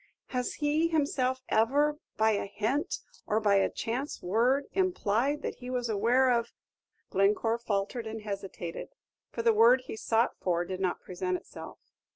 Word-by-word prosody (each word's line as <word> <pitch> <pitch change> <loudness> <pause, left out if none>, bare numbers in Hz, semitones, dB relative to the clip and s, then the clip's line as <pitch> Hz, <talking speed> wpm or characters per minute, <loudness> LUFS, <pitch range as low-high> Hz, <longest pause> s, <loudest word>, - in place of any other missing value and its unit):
"Has 250 -2 -2
he 305 +2 +1
himself 265 -5 0
ever, 290 +7 +2 0.2
by 220 0 +4
a 200 -1 -1
hint, 220 - -1 0.3
or 215 0 +2
by 205 -2 +3
a 195 - +3
chance 255 +6 -3
word, 240 +9 +2
implied 295 - +1
that - - -4
he 250 0 -8
was 250 -2 -2
aware 240 +5 +3
of 235 -1 0 0.3
" - - -47
Glencore 210 +4 +2
faltered 220 +1 -2
and 220 0 -6
hesitated, 195 - -6 0.3
for 230 - -4
the 230 -1 +5
word 235 +4 +6
he 255 - -7
sought 225 +2 +1
for 175 -1 0
did 185 +1 -5
not 185 -2 -1
present 180 0 -2
itself. - - -11
230 Hz, 165 wpm, -29 LUFS, 205-260 Hz, 0.3 s, word